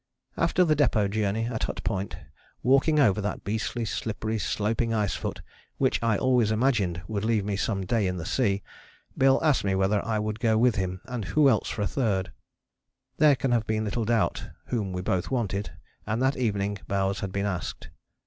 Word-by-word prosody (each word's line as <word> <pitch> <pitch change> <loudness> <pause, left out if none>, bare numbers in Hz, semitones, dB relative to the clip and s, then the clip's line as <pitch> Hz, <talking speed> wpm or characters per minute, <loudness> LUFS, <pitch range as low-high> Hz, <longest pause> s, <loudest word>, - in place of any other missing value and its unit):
After 180 - +2
the 155 -2 +3
Depôt 110 -8 +2
Journey, 110 +1 0
at 115 -2 -2
Hut - - -5
Point, 100 -2 -2 0.5
walking 135 +5 +4
over 105 -7 +4
that 105 - -3
beastly, 110 +3 -2
slippery, 110 0 -3
sloping 110 +5 0
ice 105 -2 0
foot - - -5 0.3
which - - +1
I 115 -3 +2
always 125 -3 +2
imagined 110 -7 +1
would 105 -2 -3
leave 110 -3 +1
me 100 -1 -1
some 100 -1 -1
day 105 0 +1
in 90 0 -2
the 80 - -5
sea, 100 -2 0 0.5
Bill 135 0 +4
asked 150 -4 +3
me 95 -1 +1
whether 95 +2 +1
I 110 -1 -1
would 105 +1 -2
go 110 -3 +2
with 120 +1 +4
him 95 -1 -2
and 125 -5 -4
who 150 +6 +3
else 115 -6 +2
for 105 - -2
a - - +1
third? 100 -7 -1 0.9
There 150 -2 +6
can 130 -1 -1
have 115 -2 +1
been 110 0 0
little 110 +2 -1
doubt 115 -1 0 0.2
whom 105 -6 -1
we 90 0 -4
both 90 -1 -1
wanted, 105 -8 -2 0.4
and 110 +2 -1
that 130 +2 +2
evening 100 -4 -1
Bowers 95 0 0
had 95 - -4
been 100 +1 -1
asked. 95 -4 -4
110 Hz, 195 wpm, -27 LUFS, 100-120 Hz, 0.9 s, There